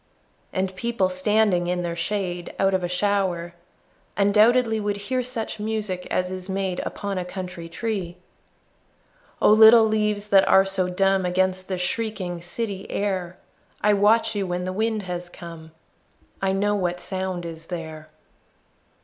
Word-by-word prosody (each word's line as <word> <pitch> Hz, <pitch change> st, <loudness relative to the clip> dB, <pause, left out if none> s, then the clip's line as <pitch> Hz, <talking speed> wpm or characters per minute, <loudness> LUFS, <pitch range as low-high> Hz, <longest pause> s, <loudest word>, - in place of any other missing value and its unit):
And 185 Hz, 0 st, -2 dB
people 225 Hz, -2 st, 0 dB
standing 185 Hz, -1 st, +2 dB
in 180 Hz, 0 st, -1 dB
their 170 Hz, -1 st, -3 dB
shade 175 Hz, -1 st, -3 dB
Out 195 Hz, 0 st, +2 dB
of 185 Hz, -1 st, +1 dB
a -, -, 0 dB
shower, 180 Hz, -2 st, 0 dB, 0.6 s
undoubtedly 220 Hz, +3 st, +4 dB
Would 205 Hz, -1 st, -1 dB
hear 255 Hz, +6 st, -2 dB
such 240 Hz, -3 st, -4 dB
music 210 Hz, -4 st, -3 dB
as 180 Hz, 0 st, -1 dB
is 185 Hz, 0 st, -7 dB
made 190 Hz, -2 st, -2 dB
Upon 200 Hz, -2 st, -4 dB
a -, -, -2 dB
country 180 Hz, -2 st, -7 dB
tree. 185 Hz, -2 st, -4 dB, 1.3 s
Oh, -, -, +7 dB
little 220 Hz, +1 st, +8 dB
leaves 210 Hz, -1 st, 0 dB
that 195 Hz, -1 st, +5 dB
are 195 Hz, 0 st, +6 dB
so 190 Hz, -1 st, 0 dB
dumb 195 Hz, +1 st, +2 dB
Against 185 Hz, +1 st, 0 dB
the 185 Hz, -, -2 dB
shrieking 180 Hz, -2 st, -3 dB
city 195 Hz, +2 st, -5 dB
air, 185 Hz, -3 st, -2 dB, 0.4 s
I 210 Hz, 0 st, +4 dB
watch 210 Hz, +3 st, +3 dB
you 200 Hz, -2 st, -2 dB
when 180 Hz, 0 st, -2 dB
the 185 Hz, -, -3 dB
wind 220 Hz, +1 st, -1 dB
has 180 Hz, -1 st, -5 dB
come, 165 Hz, -2 st, -11 dB, 0.7 s
I 195 Hz, 0 st, +1 dB
know 205 Hz, +2 st, +1 dB
what 180 Hz, -3 st, -1 dB
sound 185 Hz, -2 st, -4 dB
is 165 Hz, -1 st, -8 dB
there. 160 Hz, -3 st, -7 dB
190 Hz, 150 wpm, -24 LUFS, 180-210 Hz, 1.3 s, little